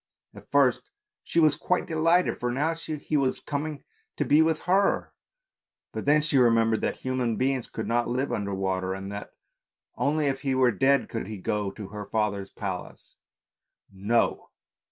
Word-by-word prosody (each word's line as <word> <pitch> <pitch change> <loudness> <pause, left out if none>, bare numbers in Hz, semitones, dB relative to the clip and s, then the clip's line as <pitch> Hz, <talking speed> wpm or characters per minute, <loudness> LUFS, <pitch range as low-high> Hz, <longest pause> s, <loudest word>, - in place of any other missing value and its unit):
At - - -14
first - - +2 0.3
she 170 - 0
was 155 -3 +5
quite 180 - 0
de 165 - -7
lighted, 165 +3 +2
for 120 0 -1
now 150 +6 0
he 155 -2 -4
was 135 -3 +1
coming 150 0 -4 0.3
to - - 0
be 150 +2 +5
with 160 0 +2
her, 195 +3 +1 0.8
but - - -5
then 150 +1 +4
she 150 -3 +2
remembered 115 -2 +3
that - - -1
human 130 -3 -1
beings 130 0 -1
could 110 - -5
not 120 +1 +1
live 130 +3 -1
under 100 -1 -2
water, 95 -1 -1
and 95 +1 -6
that 100 0 -7 0.6
only 150 +1 +1
if 135 -1 -1
he 135 -2 0
were 130 -2 +4
dead 135 +5 +2
could 115 -4 -5
he 110 -1 -6
go 105 +2 -2
to 100 0 -9
her 105 0 -7
father's 100 -2 -1
palace. 95 -4 -7 0.8
No! 105 +5 0
125 Hz, 175 wpm, -27 LUFS, 105-150 Hz, 0.8 s, was